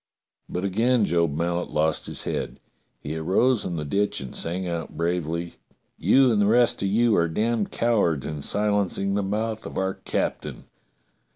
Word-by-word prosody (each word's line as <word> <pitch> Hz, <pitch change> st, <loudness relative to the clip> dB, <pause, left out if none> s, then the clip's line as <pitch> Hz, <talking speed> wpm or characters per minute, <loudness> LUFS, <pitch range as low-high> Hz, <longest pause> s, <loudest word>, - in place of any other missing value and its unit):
But 90 Hz, +2 st, -3 dB
again 115 Hz, +4 st, +2 dB
Job 85 Hz, -5 st, +1 dB
Mallet 85 Hz, +1 st, -1 dB
lost 80 Hz, +1 st, 0 dB
his -, -, -3 dB
head. -, -, -4 dB, 0.4 s
He 75 Hz, -, -5 dB
arose 100 Hz, +10 st, +2 dB
in 85 Hz, -, -3 dB
the 75 Hz, -2 st, -3 dB
ditch 100 Hz, +8 st, 0 dB
and 65 Hz, -2 st, -8 dB
sang 90 Hz, +3 st, -2 dB
out 85 Hz, -3 st, -4 dB
bravely: 85 Hz, -2 st, -2 dB, 0.4 s
"You 135 Hz, -2 st, +4 dB
and 105 Hz, -2 st, +2 dB
the 100 Hz, -, +3 dB
rest 120 Hz, +2 st, +3 dB
of 100 Hz, -, +1 dB
you 115 Hz, +3 st, +3 dB
are 85 Hz, -, +3 dB
damned 110 Hz, +5 st, 0 dB
cowards 100 Hz, -, +1 dB
in 75 Hz, -2 st, -4 dB
silencing 100 Hz, +1 st, 0 dB
the 100 Hz, -, +1 dB
mouth 110 Hz, +3 st, -2 dB
of -, -, -8 dB
our 95 Hz, 0 st, 0 dB
cap -, -, -2 dB
tain. -, -, -9 dB
95 Hz, 175 wpm, -25 LUFS, 85-110 Hz, 0.4 s, You